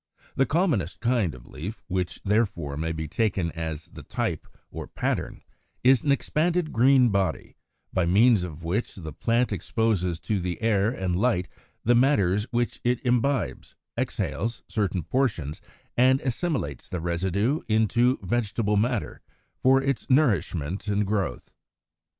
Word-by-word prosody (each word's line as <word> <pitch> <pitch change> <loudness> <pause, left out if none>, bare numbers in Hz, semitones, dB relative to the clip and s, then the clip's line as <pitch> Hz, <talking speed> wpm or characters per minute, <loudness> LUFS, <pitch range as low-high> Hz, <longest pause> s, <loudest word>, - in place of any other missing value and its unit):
The 135 - +2
commonest 140 - 0
kind 115 - +1
of - - -14
leaf, 100 +9 -7
which 90 -2 -2
therefore 95 -9 0
may 80 +3 -2
be 80 -1 -4
taken 95 -2 0
as 80 -1 -5
the - - -11
type - - -3 0.2
or - - -6
pattern, - - -3 0.4
is 130 -1 +6
an 145 - +1
expanded 165 +4 +1
green 125 +1 +5
body, 100 -2 -1 0.4
by 90 -3 +1
means 110 +3 +5
of 85 -1 -7
which 95 +9 -2
the 80 -6 -7
plant 115 - +1
exposes 90 -3 0
to 105 -3 -1
the 90 -1 -3
air 110 -2 +2
and 95 -7 -2
light 95 -4 +1 0.4
the 120 - +4
matters 105 -6 +3
which 120 -1 -1
it 120 0 +1
imbibes, 125 0 0 0.2
exhales 115 +5 -2
certain 100 -5 -1
portions, 85 - -1 0.3
and 130 +2 +5
assimilates 130 - -2
the 90 - -3
residue 95 - 0
into 115 +3 +3
vegetable 105 0 0
matter 120 +1 -1 0.4
for 135 +1 +5
its 135 0 -2
nourishment 100 - +1
and 105 0 +1
growth. 95 -10 -2
105 Hz, 140 wpm, -26 LUFS, 90-125 Hz, 0.4 s, is